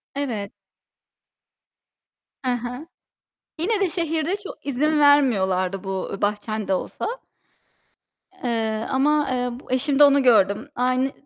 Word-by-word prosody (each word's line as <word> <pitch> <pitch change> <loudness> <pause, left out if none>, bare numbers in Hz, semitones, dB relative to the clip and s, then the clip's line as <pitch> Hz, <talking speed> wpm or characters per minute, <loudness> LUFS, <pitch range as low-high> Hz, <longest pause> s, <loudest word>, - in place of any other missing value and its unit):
Evet. 225 -8 -3 1.9
He 255 - 0
he. 250 +6 -7 0.7
Yine 415 +5 +1
de 390 -2 +1
şehirde 330 +1 -1
çok 405 -7 -10
izin 300 +3 +1
vermiyorlardı 195 -10 +3
bu 190 0 -4
bahçen 210 +1 -2
de 190 - +1
olsa, 185 - -3 1.4
eee, 225 -2 -1
ama, 295 +2 +2
eee, 250 -1 -1
bu 260 - -13
eşimde 275 +2 +3
onu 280 -1 +5
gördüm. 225 +2 +3
Aynı 255 +2 +1
255 Hz, 110 wpm, -23 LUFS, 215-290 Hz, 1.9 s, onu